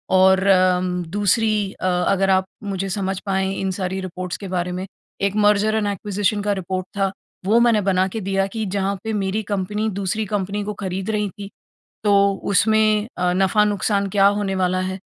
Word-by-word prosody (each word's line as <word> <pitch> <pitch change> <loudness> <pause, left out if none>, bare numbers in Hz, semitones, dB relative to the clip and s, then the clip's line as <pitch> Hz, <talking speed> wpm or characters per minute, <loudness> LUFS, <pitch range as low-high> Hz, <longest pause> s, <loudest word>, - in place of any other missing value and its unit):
और 190 0 +5
अम 185 -1 +3
दूसरी 205 0 +1
अ, - - -7
अगर 185 +2 +1
आप 190 0 +3 0.2
मुझे 195 -1 -3
समझ 190 0 -2
पाएँ 190 -1 0
इन 190 -1 -1
सारी 190 +1 -2
रिपोर्ट्स 185 -1 -5
के 200 - -7
बारे 180 -1 -2
में 185 - -4 0.4
एक 200 0 0
मर्जर 210 +1 +3
एंड 215 -2 0
एक्विजिशन 205 +1 -1
का 205 0 0
रिपोर्ट 185 -1 -3
था 195 -1 +1 0.3
वो 220 +4 +4
मैंने 235 -3 +4
बना 190 -1 +2
के 225 - -2
दिया 195 0 0
कि 220 -1 -2
जहाँ 200 0 0
पे 220 - -3
मेरी 200 +1 -1
कंपनी 210 +2 -1
दूसरी 200 +2 -1
कंपनी 205 0 -2
को 210 +1 -4
खरीद 190 0 -3
रही 210 -1 -1
थी 200 +1 -9 0.6
तो 205 - +3 0.4
उसमें 215 +1 +3
अ, 180 0 +1
नफ़ा-नुक़सान 200 +1 +1
क्या 195 0 +3
होने 195 -2 -1
वाला 185 -1 +1
है। 190 0 -4
195 Hz, 185 wpm, -21 LUFS, 185-210 Hz, 0.6 s, और